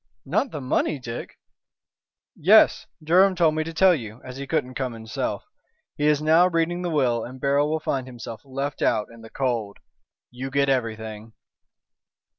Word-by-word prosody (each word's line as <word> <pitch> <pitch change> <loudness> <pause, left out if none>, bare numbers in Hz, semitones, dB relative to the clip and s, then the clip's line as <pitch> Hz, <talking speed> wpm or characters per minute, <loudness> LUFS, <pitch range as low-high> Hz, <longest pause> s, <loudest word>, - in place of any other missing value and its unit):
"Not 260 - 0
the 150 -8 -6
money, 130 +3 0
Dick?" 120 -2 -7 1.0
"Yes! - - +5 0.2
Durham 185 +4 +4
told 165 -3 +3
me 155 0 -1
to 165 - -6
tell 185 +3 +5
you, 115 -7 -6
as 125 0 -9
he 140 0 -6
couldn't 135 -4 -1
come 130 -2 -3
himself. 110 -1 -4 0.5
He 150 - 0
is 150 0 +2
now 165 +3 +5
reading 175 0 0
the 175 - -2
will 125 -7 +1
and 130 +2 -9
Beryl 140 +2 +2
will 160 +1 0
find 135 -4 -2
himself 115 -3 -8
left 135 +1 -4
out 105 - +1
in 115 - -14
the 110 - -12
cold. 115 -7 -2 0.5
You 130 +2 -6
get 140 0 +1
everything." 110 -3 -3
135 Hz, 170 wpm, -24 LUFS, 120-155 Hz, 1.0 s, Yes